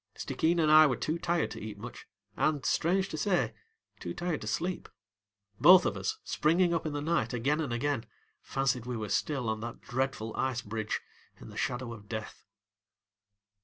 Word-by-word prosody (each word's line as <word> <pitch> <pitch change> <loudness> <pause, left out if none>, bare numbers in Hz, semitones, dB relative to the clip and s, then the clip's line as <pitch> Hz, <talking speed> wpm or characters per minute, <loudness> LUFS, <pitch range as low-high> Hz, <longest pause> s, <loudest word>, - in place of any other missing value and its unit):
Stickeen 170 +2 0
and 155 -2 +3
I 155 0 +9
were 130 - +1
too 160 +7 -2
tired 170 -1 0
to - - -7
eat 105 -1 -6
much, 120 +4 -9 0.3
and, 150 -3 +1
strange 190 +4 +2
to 155 - -4
say, 185 -2 +1 0.5
too - - -5
tired 175 -3 -2
to 110 - -6
sleep. 175 +11 -2 0.7
Both 180 +4 +8
of - - 0
us, 435 0 -2
springing 170 +3 +2
up 165 -1 -1
in 150 - -3
the 145 0 -3
night 150 -8 0
again 135 +6 +1
and 145 - -3
again, 125 0 -1 0.3
fancied 125 -3 -1
we 125 -1 -2
were 105 -2 -4
still 135 +3 0
on 110 0 -1
that 120 +1 -6
dreadful 125 -3 -2
ice 125 -2 -1
bridge 110 0 -3 0.4
in - - -11
the - - -11
shadow 125 -2 -2
of 105 -3 -13
death. 110 -1 -6
135 Hz, 185 wpm, -30 LUFS, 115-165 Hz, 0.7 s, I